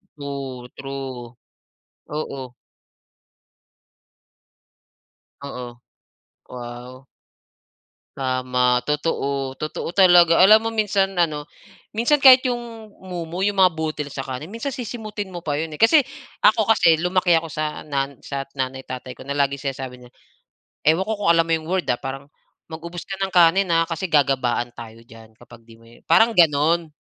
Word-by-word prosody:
True, 135 -3 -7
true. 130 -3 -7 0.7
Oo. 135 -4 -6 2.9
Oo, 125 -3 -8 0.7
wow. 125 +1 -9 1.1
Tama, 125 -1 +1
totoo. 140 -3 -1
Totoo 155 +3 -5
talaga. 175 -3 +6
Alam 215 +4 +7
mo - - +1
minsan, 200 -3 +1
ano 155 -4 0 0.5
minsan 240 +7 +2
kahit 260 -1 +9
'yong 235 -3 -4
mumo, 175 -1 -6
'yong 205 -1 -1
mga 185 -2 +6
butil 155 -2 -4
sa 135 - -5
kanin 130 +5 -6
minsan 230 +6 -5
sisimutin 215 -4 -6
mo 175 - -6
pa 145 -1 -1
'yon 160 0 -4
eh, - - -8
kasi 290 +7 +6 0.4
ako 220 0 +4
kasi 170 -7 +5
lumaki 180 0 +2
ako 165 0 -4
sa 155 -1 -4
nan 140 -2 -3
sa 140 -1 -5
nanay 130 0 -3
tatay 130 0 -7
ko - - -12
na 140 - -3
laging 140 0 0
sinasabi 130 -1 -8
niya, 125 - -15 0.8
ewan 160 +4 +4
ko 220 - 0
kung 200 -4 +2
alam 165 0 +3
mo 165 - -4
'yong 160 -1 -6
word, 185 -1 0
ah, 120 - -1
parang, 135 +1 -6 0.5
"mag-ubos 170 +2 -7
ka 195 - -5
ng 195 -1 -2
kanin, 180 +2 +4
ha, 165 0 +3
kasi 165 +2 -3
gagabaan 130 -5 +1
tayo 115 -1 -10
diyan 115 -1 -16
kapag 120 -1 -16
'di 115 - -16
mo" - - -19 0.3
parang 230 +1 +5
ganon. 160 +1 +3
155 Hz, 145 wpm, -22 LUFS, 130-185 Hz, 2.9 s, kahit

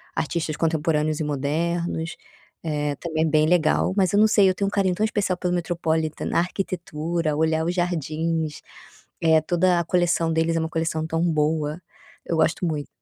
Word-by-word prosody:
artistas 155 -1 -2
contemporâneos 155 -1 0
e - - -1
modernos, 160 +4 -2 0.5
eh, 150 -2 -1
também 160 -2 -2
é - - +1
bem 155 0 +3
legal, 175 +1 +2
mas 190 -1 +2
eu 205 - +4
não 220 - +6
sei. 205 -3 +5
Eu - - +2
tenho 200 +1 -1
um - - -2
carinho 190 -3 +1
tão 215 - -1
especial 205 -4 0
pelo 180 0 -1
Metropolitam, 160 -3 -1
a - - +3
arquitetura, 170 -3 -2
olhar 160 0 +1
os 175 - 0
jardins, 160 -2 -2 0.6
eh, 160 -1 +4
toda 175 +2 +2
a - - 0
coleção 175 -2 +1
deles 165 +1 +1
é - - +1
uma 160 0 -2
coleção 160 -1 -1
tão 165 +1 -1
boa, 155 0 0 0.4
eu 165 - -1
gosto 160 +3 +1
muito. 150 -3 -2
165 Hz, 180 wpm, -24 LUFS, 155-175 Hz, 0.6 s, não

